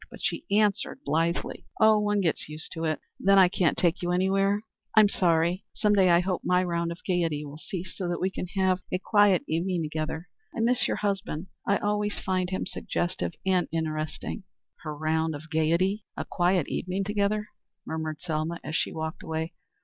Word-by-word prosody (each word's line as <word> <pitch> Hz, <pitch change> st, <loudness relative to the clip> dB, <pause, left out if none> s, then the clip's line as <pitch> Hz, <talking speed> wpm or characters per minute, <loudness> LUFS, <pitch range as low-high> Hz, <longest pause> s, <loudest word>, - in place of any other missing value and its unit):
But -, -, -11 dB
she -, -, -1 dB
answered 205 Hz, 0 st, +1 dB
blithely, 165 Hz, +4 st, -1 dB
"Oh, 220 Hz, -1 st, +6 dB
one 210 Hz, -1 st, +1 dB
gets 165 Hz, -4 st, -1 dB
used 155 Hz, +1 st, -6 dB
to 165 Hz, 0 st, -3 dB
it. 155 Hz, -1 st, 0 dB, 0.2 s
Then 195 Hz, +1 st, +5 dB
I 190 Hz, -2 st, +8 dB
can't 175 Hz, -2 st, +1 dB
take 170 Hz, 0 st, +2 dB
you 175 Hz, 0 st, -1 dB
anywhere? 195 Hz, +3 st, +2 dB, 0.3 s
I'm 215 Hz, -1 st, +8 dB
sorry. 175 Hz, -1 st, +2 dB
Some 210 Hz, -1 st, +3 dB
day 190 Hz, -3 st, +5 dB
I 170 Hz, 0 st, +6 dB
hope 180 Hz, 0 st, -1 dB
my 180 Hz, 0 st, +3 dB
round 170 Hz, -1 st, -1 dB
of 170 Hz, -, -5 dB
gayety 165 Hz, -5 st, 0 dB
will 145 Hz, +1 st, -9 dB
cease, 180 Hz, 0 st, -6 dB
so 185 Hz, -, -3 dB
that 175 Hz, -, -1 dB
we 190 Hz, -, 0 dB
can 180 Hz, -, -4 dB
have 190 Hz, -1 st, +3 dB
a -, -, +2 dB
quiet 205 Hz, -1 st, +4 dB
evening 170 Hz, +1 st, 0 dB
together. 155 Hz, +2 st, -3 dB, 0.3 s
I -, -, -3 dB
miss 245 Hz, +2 st, +4 dB
your -, -, -1 dB
husband. 190 Hz, -4 st, -2 dB, 0.2 s
I 200 Hz, -, +4 dB
always 210 Hz, 0 st, -1 dB
find 185 Hz, -1 st, -1 dB
him 185 Hz, -, -2 dB
suggestive 175 Hz, 0 st, -2 dB
and 185 Hz, -2 st, +2 dB
interesting." 155 Hz, -1 st, -3 dB, 0.4 s
"'Her 155 Hz, -2 st, -6 dB
round 160 Hz, +1 st, 0 dB
of 155 Hz, +3 st, -10 dB
gayety! 170 Hz, +6 st, +2 dB
A -, -, -3 dB
quiet 175 Hz, -2 st, +1 dB
evening 185 Hz, +2 st, -2 dB
together!'" 210 Hz, +1 st, 0 dB, 0.4 s
murmured 160 Hz, -1 st, -4 dB
Selma 165 Hz, 0 st, -2 dB
as 160 Hz, -, -4 dB
she -, -, +1 dB
walked 160 Hz, 0 st, -4 dB
away. 160 Hz, 0 st, -3 dB
180 Hz, 190 wpm, -27 LUFS, 160-195 Hz, 0.4 s, I